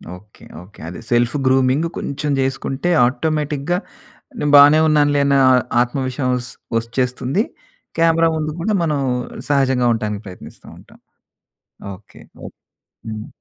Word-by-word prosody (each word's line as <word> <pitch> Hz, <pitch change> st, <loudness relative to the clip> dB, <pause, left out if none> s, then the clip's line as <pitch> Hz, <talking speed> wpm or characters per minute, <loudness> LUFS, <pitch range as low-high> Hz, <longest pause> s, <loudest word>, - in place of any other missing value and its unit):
Okay. 105 Hz, +3 st, -18 dB, 0.2 s
Okay. 95 Hz, +3 st, -17 dB
అది 90 Hz, -, -8 dB
self 120 Hz, +2 st, +2 dB
grooming 130 Hz, +3 st, +2 dB
కొంచెం 145 Hz, +1 st, -3 dB
చేసుకుంటే 135 Hz, +4 st, -2 dB, 0.2 s
ఆటోమేటిక్‌గా 150 Hz, +4 st, -1 dB, 0.6 s
నే -, -, -1 dB
బానే 145 Hz, +2 st, +8 dB
ఉన్నానులే 145 Hz, -2 st, +3 dB
అనే 140 Hz, 0 st, +3 dB, 0.4 s
ఆత్మ 125 Hz, +3 st, -2 dB
విశ్వసం 130 Hz, 0 st, -2 dB, 0.5 s
వచ్చేస్తుంది. 125 Hz, -, -1 dB, 0.6 s
క్యామెరా 165 Hz, 0 st, +3 dB
ముందు 155 Hz, 0 st, -3 dB
కూడా 215 Hz, +4 st, 0 dB
మనం 150 Hz, -3 st, 0 dB, 0.5 s
సహజంగా 130 Hz, -3 st, +2 dB
ఉంటానికి 105 Hz, -1 st, -4 dB
ప్రయత్నిస్తూ 90 Hz, -, -12 dB
ఉంటాం. -, -, -19 dB, 1.0 s
ఓకే. 100 Hz, +1 st, -19 dB, 0.3 s
ఓకే. -, -, -14 dB, 0.5 s
హ్మ్. 110 Hz, 0 st, -6 dB
135 Hz, 115 wpm, -19 LUFS, 120-150 Hz, 1.0 s, బానే